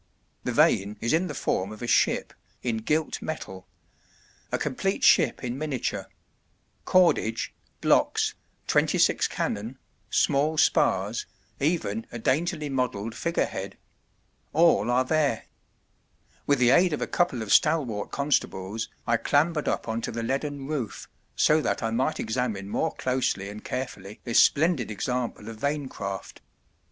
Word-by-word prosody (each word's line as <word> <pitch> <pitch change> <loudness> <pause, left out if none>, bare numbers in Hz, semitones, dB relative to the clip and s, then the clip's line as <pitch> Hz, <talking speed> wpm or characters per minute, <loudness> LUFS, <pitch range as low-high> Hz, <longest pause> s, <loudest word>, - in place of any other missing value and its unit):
The - - 0
vane 100 +2 +3
is 115 - 0
in 170 +3 +2
the 150 - -6
form 95 -3 -1
of 110 +2 -9
a - - -3
ship, - - +2 0.3
in 115 -2 0
gilt 150 +8 -1
metal: 95 -12 -6 0.8
a - - +1
complete - - -2
ship - - +4
in 125 +2 -3
miniature 150 -5 -3 0.8
cordage, 170 -11 +2 0.3
blocks, - - +2 0.3
twenty - - +2
six - - +3
cannon, 115 +6 -3 0.3
small 150 +3 +2
spars, - - +2 0.3
even 135 - -1
a 120 - -5
daintily 155 +6 0
modelled 125 -5 -2
figurehead: 115 - -2 0.8
all 150 -9 +4
are 125 +1 +3
there. 145 -5 +1 1.0
With 145 - +4
the 125 -1 +4
aid 175 +4 +4
of - - -2
a - - 0
couple 155 -10 0
of 105 - 0
stalwart 140 -10 +2
constables 110 -7 -1 0.2
I 115 -1 +2
clambered 150 +4 +1
up - - -1
on 115 0 -2
to - - -3
the 115 0 -4
leaden 140 +3 -2
roof, 135 -7 -4 0.3
so 155 +1 +4
that - - -1
I 115 - 0
might 130 +7 0
examine 110 -4 -2
more 160 +9 -1
closely 125 -6 -1
and 105 +1 -9
carefully 105 -5 -5
this 115 -2 +4
splendid 155 -6 +3
example 120 0 -3
of 115 -1 -7
vane 140 +3 -2
craft. 100 -4 -6
125 Hz, 145 wpm, -26 LUFS, 110-150 Hz, 1.0 s, ship